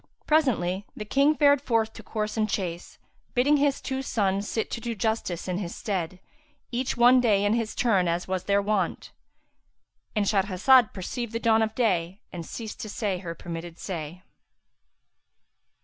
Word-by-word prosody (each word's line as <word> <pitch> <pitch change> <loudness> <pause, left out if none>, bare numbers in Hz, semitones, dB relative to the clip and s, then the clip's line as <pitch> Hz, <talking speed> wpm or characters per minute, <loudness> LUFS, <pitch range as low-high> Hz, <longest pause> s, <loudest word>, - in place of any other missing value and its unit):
Presently, 205 - +1
the 210 - -5
King 280 +7 +3
fared 285 -2 +4
forth 225 -5 0
to - - -10
course 215 -1 -3
and 215 -1 0
chase, 175 -4 -4 0.4
bidding 280 +4 +4
his 285 -1 +2
two 265 0 -3
sons 200 -5 0
sit 220 - -2
to 235 - -4
do 235 -1 -3
justice 205 -5 -2
in 180 0 -1
his 175 -4 -5
stead, 185 -4 -3 0.5
each 250 +1 -2
one 245 +1 +6
day 205 -4 +3
in 205 +2 +3 0.2
turn 195 -7 +2
as 170 +1 -1
was 185 -1 -2
their 200 0 +2
wont.—And 210 +1 -5
Shahrazad 205 +5 +4
perceived 230 +5 -5
the 230 - -1
dawn 225 -1 +3
of 220 0 -1
day 190 -5 0
and 170 -2 -5
ceased 220 +5 -7
to 215 - -5
say 200 -4 -2
her 170 -2 -6
permitted 170 0 -7
say. 175 -1 -6
210 Hz, 160 wpm, -26 LUFS, 185-235 Hz, 0.5 s, one